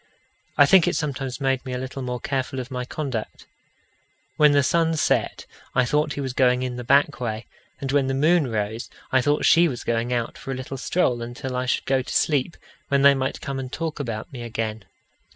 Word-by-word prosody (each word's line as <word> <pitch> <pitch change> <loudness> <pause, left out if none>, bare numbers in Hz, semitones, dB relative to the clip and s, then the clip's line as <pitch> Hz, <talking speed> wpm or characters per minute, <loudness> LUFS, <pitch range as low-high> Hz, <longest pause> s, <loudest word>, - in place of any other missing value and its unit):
I - - +8
think 190 -4 +5
it - - +1
sometimes 135 -3 -3
made 135 -2 0
me 130 -2 -5
a - - -2
little 130 +2 -5
more 125 -1 -3
careful 135 0 -2
of 130 +1 -6
my 125 -1 -3
conduct. 130 -5 -5 0.9
When 150 -1 +5
the 145 -1 +4
sun 165 +3 +2
set, 155 - 0 0.3
I 130 -1 +4
thought 150 +4 +1
he 145 - -4
was 130 -2 -3
going 125 -1 +3
in 125 -1 -3
the 125 - -5
back 140 +4 +3
way; 115 -2 -3 0.3
and 135 -1 -3
when 140 -1 +2
the 135 - 0
moon 155 +2 +3
rose, 110 +1 -3 0.2
I 130 - +4
thought 145 +3 +1
she 170 +1 +6
was 125 -6 -5
going 115 +1 -1
out 120 -2 -2
for - - -10
a 135 - -1
little 130 +1 -6
stroll 125 -4 0
until 120 +2 -5
I 125 0 -1
should - - 0
go 135 -1 +2
to 125 - -8
sleep, 145 +1 +1 0.3
when 140 -1 +2
they 140 0 +8
might 135 0 -2
come 135 -1 -4
and 130 -1 -6
talk 160 -2 -4
about 115 +1 -5
me 125 - -7
again. 110 -3 -4
130 Hz, 220 wpm, -24 LUFS, 125-140 Hz, 0.9 s, I